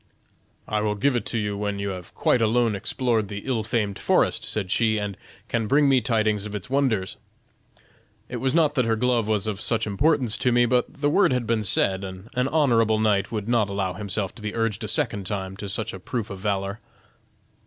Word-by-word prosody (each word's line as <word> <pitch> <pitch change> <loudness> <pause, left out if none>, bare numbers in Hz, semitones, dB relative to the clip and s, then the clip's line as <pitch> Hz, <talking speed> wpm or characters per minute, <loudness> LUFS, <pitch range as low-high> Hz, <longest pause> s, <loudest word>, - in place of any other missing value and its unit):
'I 105 0 0
will 105 0 0
give 125 +6 +1
it 120 - -1
you 105 -3 -1
when 100 0 -2
you 100 0 -2
have 90 -2 -7
quite 125 - +2
alone 115 0 +2
explored 110 +1 0
the 100 0 -6
ill 125 -4 0
famed 105 -2 -1
forest,' - - +2
said 100 -4 -2
she, 110 -2 +2
'and 105 -2 -3 0.3
can 115 -2 -1
bring 145 +4 +4
me 135 -2 +4
tidings 110 -2 +1
of 105 - -7
its 105 +5 -7
wonders.' 125 -9 0 1.1
It - - -5
was 130 +2 0
not 155 -3 +3
that 130 -5 +1
her 115 0 +2
glove 120 -1 +1
was 105 -2 0
of 105 -1 -3
such 115 -1 0
importance 125 +2 +2
to 125 - +1
me, 120 0 +4
but 125 0 +1
the 145 +1 -1
word 185 0 +4
had 125 -2 0
been 115 0 +1
said, 95 0 +1
and 95 +3 -8
an 125 +1 +1
honorable 120 -8 +3
knight 100 -3 +1
would 105 -2 -3
not 115 -4 +2
allow 100 -2 -2
himself 100 0 -3
to - - -14
be 105 -1 -4
urged 115 -3 -1
a - - -3
second 115 - -1
time 95 -2 -3
to 100 0 -6
such 105 +2 -2
a 95 - -7
proof 110 +3 -4
of 95 - -6
valor." 100 0 -2
110 Hz, 215 wpm, -24 LUFS, 100-120 Hz, 1.1 s, bring